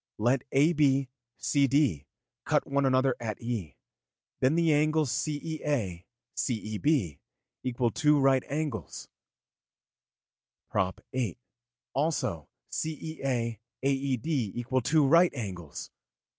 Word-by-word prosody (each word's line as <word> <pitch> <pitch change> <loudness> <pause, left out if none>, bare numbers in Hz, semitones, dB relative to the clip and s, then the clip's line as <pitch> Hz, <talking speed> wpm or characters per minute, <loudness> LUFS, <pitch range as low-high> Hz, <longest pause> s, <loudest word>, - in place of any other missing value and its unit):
Let 120 +4 +2
AB, 140 -2 +3 0.3
CD, 140 - +2 0.4
cut - - +1
one 140 0 +1
another 130 0 +3
at 110 -3 -4
E, 115 - -4 0.6
then 130 +4 +3
the 165 -2 +4
angles 155 -2 +2
CEA, 145 - -2 0.3
CEB 110 - 0 0.4
equal 125 -2 0
two 150 -1 +3
right 135 -1 +4
angles 145 - -4 1.6
(prop. 95 -1 0
xiii.). 125 -1 -1 0.6
Also 135 - -1 0.2
CEA, 135 -8 -2 0.2
AED 135 -2 0
equal 130 - 0
two 150 +4 +3
right 170 +5 +6
angles.' 90 - -6
135 Hz, 95 wpm, -29 LUFS, 115-150 Hz, 1.6 s, right